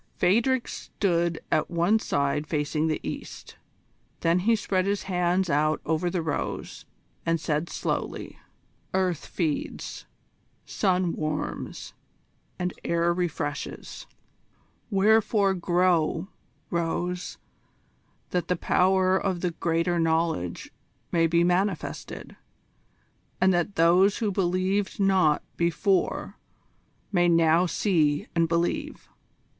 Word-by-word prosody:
Phadrig 235 +7 +2
stood 170 -3 -1
at 155 - +1
one 175 +6 +2
side 145 -3 -1
facing 150 +1 0
the 155 - 0
east. - - -7 0.6
Then 170 +2 +3
he 225 +5 +3
spread 190 -3 0
his 200 0 0
hands 180 0 +1
out 155 0 +1
above 160 +3 0
the 175 -2 -1
rose, 155 -3 -4 0.4
and 165 0 +1
said 155 +2 -1
slowly: - - -4 0.6
"Earth 185 -4 0
feeds, 160 -5 -3 0.6
sun 185 -3 +1
warms, 155 -1 -4 0.6
and 180 0 -2
air 170 0 +1
refreshes: 160 -5 -4 0.8
wherefore 205 -1 +3
grow, 175 0 +1 0.4
rose, 175 +2 -2 0.9
that 180 -1 -1
the 180 - +1
power 185 +2 +3
of 190 -2 -1
the 180 - 0
Greater 170 +1 0
Knowledge 160 - 0 0.4
may 165 -1 +3
be 170 +1 +3
manifested, 180 +1 -2 1.0
and 185 0 +4
that 175 +3 0
those 180 +4 +4
who 215 -3 0
believed 190 +2 0
not 190 -6 +3
before 170 +3 0 0.7
may 175 -3 +3
now 165 +1 +4
see 160 -6 +1
and 165 -1 +2
believe." 170 +1 -1
175 Hz, 105 wpm, -26 LUFS, 165-190 Hz, 1.0 s, and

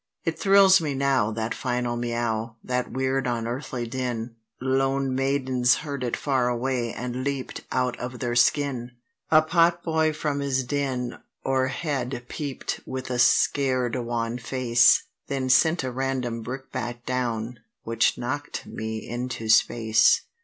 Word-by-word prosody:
It - - -2
thrills 195 -2 +6
me 145 -3 -2
now, 135 -5 +2
that 110 +1 -2
final 125 -2 -2
Miaow—that 120 +1 -2
weird 130 +1 0
unearthly 120 +1 -3
din: 120 -1 -4 0.2
Lone 135 +1 +1
maidens 130 -2 +2
heard 140 -3 -4
it 120 - -1
far 130 -4 +1
away, 120 -1 -1
and 125 +3 -4
leap'd 140 -1 -3
out 125 -1 0
of 125 0 -5
their 120 -2 -2
skin. 125 -1 +2 0.4
A 155 0 +6
potboy 165 -1 +2
from 150 -2 -2
his 135 -2 0
den 125 -2 -2 0.3
o'erhead 130 -1 -1
peep'd 145 -4 -4
with 130 0 -5
a 125 - -1
scared 130 -1 +3
wan 120 -1 -2
face; 120 -1 +4 0.2
Then 135 -2 -2
sent 160 +4 +4
a 130 - -2
random 125 -2 -2
brickbat 120 -1 -6
down, 120 -2 -2 0.2
which 115 0 +1
knock'd 145 +4 -4
me 110 0 -5
into 120 -2 -4
space. 110 0 +4
125 Hz, 130 wpm, -25 LUFS, 120-135 Hz, 0.4 s, thrills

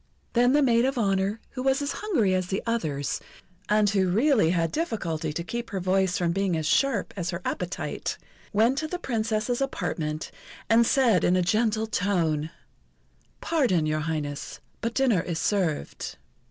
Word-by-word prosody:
Then 245 +2 +4
the 295 0 +4
maid 235 -2 +4
of 270 0 -1
honour, 200 -1 +1
who 255 - -5
was 265 +1 +2
as 285 0 -2
hungry 290 - +1
as 185 -1 0
the 195 +2 -2
others, 155 - -1 0.5
and 210 0 +4
who 195 -2 +2
really 225 - +3
had 165 -1 +1
difficulty 170 - -2
to 170 +3 -4
keep 235 +7 -5
her 195 - -3
voice 185 0 +1
from 175 -2 +1
being 190 -2 0
as 160 - -2
sharp 275 - +1
as 175 -3 -3
her 170 - -3
appetite, 180 0 -3 0.3
went 230 +6 +3
to 315 - -3
the 360 - -3
Princess's 230 -4 -1
apartment, 155 - -3 0.4
and 230 +1 +5
said 235 -9 +3
in 180 - +3
a 185 - +2
gentle 220 +3 +1
tone: 170 -7 0 0.9
"Pardon, 245 - +2
Your 155 0 0
Highness, 150 -2 -4 0.2
but 230 0 -2
dinner 250 -10 +3
is 170 -2 -4
served." 175 -4 -1
200 Hz, 165 wpm, -26 LUFS, 170-240 Hz, 0.9 s, and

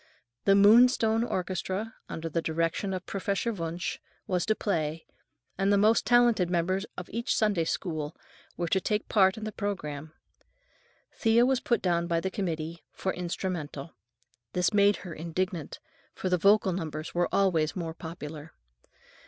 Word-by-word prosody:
The 195 - +6
Moonstone 225 +2 +6
Orchestra, 190 +1 -3 0.2
under 165 0 -4
the 165 +1 -1
direction 165 +4 -1
of 185 -1 -4
Professor 200 +4 -1
Wunsch, 170 -2 -4 0.3
was 180 -2 -1
to 215 - +3
play, 160 -6 -2 0.5
and 195 +1 +3
the 200 - +5
most 215 +3 +3
talented 240 -7 +4
members 185 +3 0
of 180 - -6
each 235 +3 -1
Sunday 205 -7 +2
School 155 -3 -3 0.4
were 175 - -1
to 190 +3 +1
take 210 +1 -1
part 190 -2 +4
in 220 - -7
the 215 - -3
programme. 155 -8 -4 1.0
Thea 230 +2 +4
was 260 -1 +2
put 235 -4 0
down 170 -2 +1
by 170 -1 +1
the 190 +3 -3
committee 165 -3 -4
"for 190 - -3
instrumental." 170 -4 -4 0.6
This 180 +3 +1
made 205 0 +5
her 175 - -6
indignant, 170 0 -3 0.4
for 185 - -2
the 180 - +3
vocal 200 +1 +4
numbers 155 -3 -5
were 175 0 +1
always 170 -6 +2
more 165 -3 -4
popular. 160 -2 -8
185 Hz, 155 wpm, -28 LUFS, 165-205 Hz, 1.0 s, The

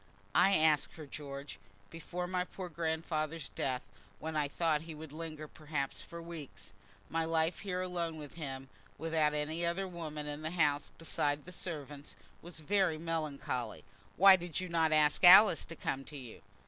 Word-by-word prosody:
"I 195 0 +5
asked 155 -2 +3
her, 155 - -8
George, 140 0 -8 0.3
before 175 +2 -5
my 180 0 0
poor 180 0 -7
grandfather's 160 -1 -2
death, 130 -1 -2 0.3
when 160 +5 -5
I 150 -1 +1
thought 155 +1 +1
that 160 - -12
he 160 - -7
would 155 -1 -9
linger 155 -1 -6
perhaps 150 -3 -3
for 170 - -9
weeks. 140 -13 -9 0.3
My 165 0 0
life 160 +1 +1
here 185 -2 -2
alone 170 -3 -3
with 150 -2 -9
him, 135 -5 -6 0.3
without 160 -2 +1
any 155 +3 -2
other 170 +3 0
woman 155 -4 -6
in 145 0 -5
the 155 - -2
house 150 -4 +1
beside 145 -3 0
the 180 - -10
servants, 150 -5 -6 0.3
was 170 -1 -8
very 185 -1 +2
melancholy." 150 -7 -3 0.3
"Why 195 0 +9
did 175 -2 -4
you 185 -1 -4
not 165 -2 +2
ask 155 +3 +4
Alice 185 0 +9
to 165 - -8
come 135 -3 -3
to 150 - -9
you?" 125 -5 -10
160 Hz, 175 wpm, -33 LUFS, 150-170 Hz, 0.3 s, Why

